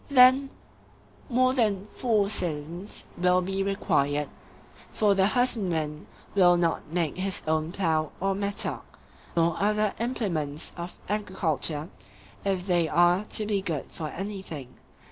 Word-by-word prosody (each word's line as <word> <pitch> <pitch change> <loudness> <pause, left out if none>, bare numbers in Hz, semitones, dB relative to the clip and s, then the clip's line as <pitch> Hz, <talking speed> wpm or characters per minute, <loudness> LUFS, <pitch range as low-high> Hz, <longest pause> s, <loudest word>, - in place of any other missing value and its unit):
Then 260 0 +6 0.8
more 255 +1 +3
than 210 -6 +1
four 220 -5 +1
citizens 175 0 -3
will 180 0 +4
be 190 +2 -2
required; 150 -7 0 0.6
for 210 -2 +3
the 195 0 +3
husbandman 185 -11 0 0.3
will 175 -3 +5
not 170 -1 0
make 165 -2 -1
his 195 +1 +1
own 155 +1 0
plough 160 -5 0
or 195 +1 +1
mattock, 200 +1 -2 0.4
or 165 +1 +2
other 210 0 +2
implements 170 - -1
of 175 0 -7
agriculture, 170 -7 -1 0.6
if 190 -2 -1
they 175 -3 +2
are 175 +3 +4
to 215 - 0
be 205 -2 0
good 165 -7 -4
for 155 - -5
anything. 175 -8 -6
185 Hz, 125 wpm, -27 LUFS, 165-205 Hz, 0.8 s, Then